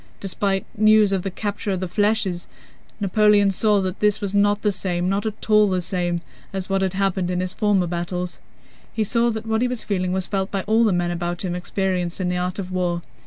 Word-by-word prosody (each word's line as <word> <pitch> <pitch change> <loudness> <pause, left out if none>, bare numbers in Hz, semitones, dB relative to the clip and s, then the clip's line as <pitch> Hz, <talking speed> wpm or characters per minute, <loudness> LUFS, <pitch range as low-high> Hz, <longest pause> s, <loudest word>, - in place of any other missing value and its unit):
Despite 195 0 -1
news 215 -1 +5
of 195 -2 +1
the 195 - -3
capture 205 +2 -4
of 190 -2 0
the 185 - -3
flèches, 205 -2 0 0.5
Napoleon 205 0 +4
saw 205 +1 +2
that 185 0 -3
this 210 -1 +2
was 200 -2 -3
not 205 0 +2
the 210 - +3
same, 180 -2 -1
not 200 +3 0
at 215 0 -6
all 210 -1 +5
the 185 -1 +1
same, 175 -1 -1 0.3
as 190 -1 -4
what 195 0 +1
had 190 -1 0
happened 190 -2 0
in 180 0 -1
his 185 0 -2
former 205 -4 +2
battles. 175 +1 -3 0.5
He 220 - 0
saw 235 +3 +2
that 220 -1 -4
what 220 0 0
he 250 - +3
was 245 -2 -4
feeling 185 -3 -1
was 190 0 -1
felt 195 0 -2
by 195 -2 -2
all 225 +2 +3
the 215 - +3
men 175 -1 0
about 175 +1 -3
him 175 - -2
experienced 180 0 -2
in 180 -1 0
the 180 - -1
art 180 0 -2
of 185 -2 -5
war. 175 -2 -1
195 Hz, 225 wpm, -22 LUFS, 180-210 Hz, 0.5 s, news